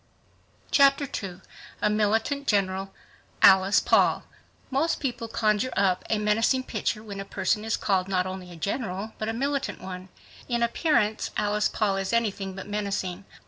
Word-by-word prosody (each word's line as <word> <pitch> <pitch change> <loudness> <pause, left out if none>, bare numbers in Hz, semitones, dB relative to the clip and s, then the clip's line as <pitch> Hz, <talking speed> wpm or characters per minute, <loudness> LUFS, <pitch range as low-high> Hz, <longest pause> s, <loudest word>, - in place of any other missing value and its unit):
Chapter 275 0 +5
2 190 -8 -6 0.4
A 210 - +4
Militant 220 +7 0
General—Alice 195 0 +2
Paul - - +3 0.5
Most 310 +6 +1
people 240 -4 -3
conjure 215 +2 +1
up 185 -2 +2
a 220 - +2
menacing 225 +5 +2
picture 215 -3 -2
when 200 -2 -7
a - - -3
person 210 +1 -1
is 220 0 -1
called 190 -2 0
not 185 -2 +1
only 185 -1 -6
a - - -10
general, 200 +3 -3
but 215 - -2
a - - -1
militant 275 +3 -2
one. 185 0 -8 0.4
In 235 -1 +1
appearance 235 -3 +1
Alice 210 0 +1
Paul 200 -3 0
is 195 +2 -2
anything 200 -4 -1
but 190 +1 -7
menacing. 200 -2 -3
210 Hz, 150 wpm, -26 LUFS, 195-230 Hz, 0.5 s, Chapter